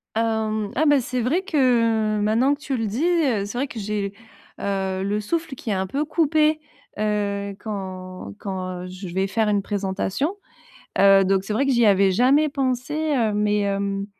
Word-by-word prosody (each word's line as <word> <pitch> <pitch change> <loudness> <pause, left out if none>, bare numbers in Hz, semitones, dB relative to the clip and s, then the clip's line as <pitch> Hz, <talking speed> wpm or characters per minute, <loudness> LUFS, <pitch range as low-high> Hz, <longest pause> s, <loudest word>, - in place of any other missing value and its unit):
Hem, 220 -2 0
ah, 310 - +2
bah, 290 -2 +5
c'est 250 0 -2
vrai 280 +11 +1
que 230 - +2
maintenant 225 +7 +2
que 285 - -6
tu 285 -3 -3
le 225 -2 -1
dis, 220 +8 -2
heu, 290 - +2
c'est 205 +4 -6
vrai 275 +3 0
que 235 - -7
j'ai, 205 -1 -2 0.5
heu, 190 -1 -2
le 205 +2 -1
souffle 320 +5 -3
qui 245 - -7
est - - +1
un 190 0 -1
peu 275 +10 -1
coupé, 310 0 +2 0.4
heu, 200 -1 -1
quand 185 - -6
quand 185 -2 -5
je 185 +1 -8
vais 190 +1 0
faire 215 +3 0
une 205 -1 +2
présentation. 200 - -2 0.6
Heu, 195 0 +7
donc 190 0 +1
c'est 210 - -3
vrai 270 +6 +1
que 275 - +2
j'y 240 -2 +4
avais 195 -1 +4
jamais 260 +9 +4
pensé, 260 -1 -2 0.2
heu, 225 -4 +1
mais 210 0 +1
hem, 200 0 -1
210 Hz, 185 wpm, -23 LUFS, 195-260 Hz, 0.6 s, Heu